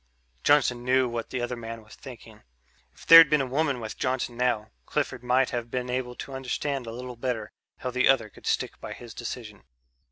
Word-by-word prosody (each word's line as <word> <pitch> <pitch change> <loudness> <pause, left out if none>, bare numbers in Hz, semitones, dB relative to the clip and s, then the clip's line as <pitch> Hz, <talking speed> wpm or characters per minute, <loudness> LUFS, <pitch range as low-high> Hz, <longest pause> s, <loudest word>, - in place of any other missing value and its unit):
Johnson 130 -4 +3
knew 130 +1 +3
what 120 -1 -4
the 130 - -3
other 120 +1 -2
man 115 -1 -8
was 105 - -16
thinking. - - -12 0.5
If - - -17
there'd 165 -2 +10
been 150 0 +4
a 135 - 0
woman 140 0 0
with 110 -2 -7
Johnson 130 -2 -1
now, 120 -3 0 0.2
Clifford 125 - -2
might 125 +1 +2
have 120 -1 -3
been 125 0 -3
able 125 -1 -3
to 135 - -8
understand 135 0 -3
a - - -5
little 125 +1 -7
better 120 -3 -3 0.3
how 125 - -4
the 130 +1 +2
other 125 -5 +4
could - - -13
stick - - -1
by - - -6
his 120 -2 -11
decision. 115 -3 -7
125 Hz, 200 wpm, -27 LUFS, 120-130 Hz, 0.5 s, there'd